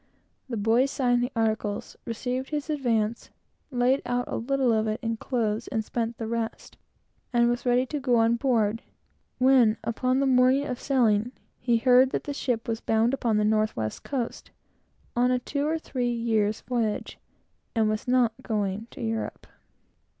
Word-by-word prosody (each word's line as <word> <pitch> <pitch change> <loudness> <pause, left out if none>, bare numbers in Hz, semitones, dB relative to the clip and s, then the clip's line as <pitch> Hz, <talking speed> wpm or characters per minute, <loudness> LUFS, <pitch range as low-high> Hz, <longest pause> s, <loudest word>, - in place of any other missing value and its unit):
The 235 - -3
boy 225 +5 +3
signed 245 -3 +1
the 245 +2 -1
articles, 220 -2 -1
received 250 +3 -3
his 300 +1 -3
advance, 230 -6 -1 0.4
laid 255 0 +2
out 245 0 -1
a - - -4
little 265 0 +1
of 220 0 +1
it 215 +1 -2
in 225 0 -1
clothes, 225 -2 -1
and 220 -4 -2
spent 230 0 -3
the 225 - -4
rest, 225 0 -4 0.6
and 240 -1 +3
was 240 +1 -1
ready 245 +1 +3
to 295 +3 -4
go 255 -3 +2
on 230 0 +4
board, 230 -4 +1 0.6
when, 250 -4 +5
upon 255 +3 0
the 275 - +2
morning 260 +2 +4
of 250 -2 -4
sailing, 240 -3 +2 0.3
he 240 -1 +2
heard 255 +2 +5
that - - -1
the 290 - -4
ship 245 -5 -2
was 225 -1 -2
bound 225 +3 +2
upon 235 -5 +1
the 210 - +2
North 215 0 +1
west 110 -1 -4
Coast, 255 -5 -4 0.7
on 245 +1 +3
a 250 - +3
two 280 +4 -2
or 320 +1 0
three 250 -6 -2
years' 220 -3 0
voyage, 230 -4 -2 0.6
and 220 -1 +3
was 215 +2 -2
not 245 -3 +3
going 210 -2 -2
to 255 - -8
Europe. 225 0 -3
240 Hz, 170 wpm, -26 LUFS, 225-255 Hz, 0.7 s, when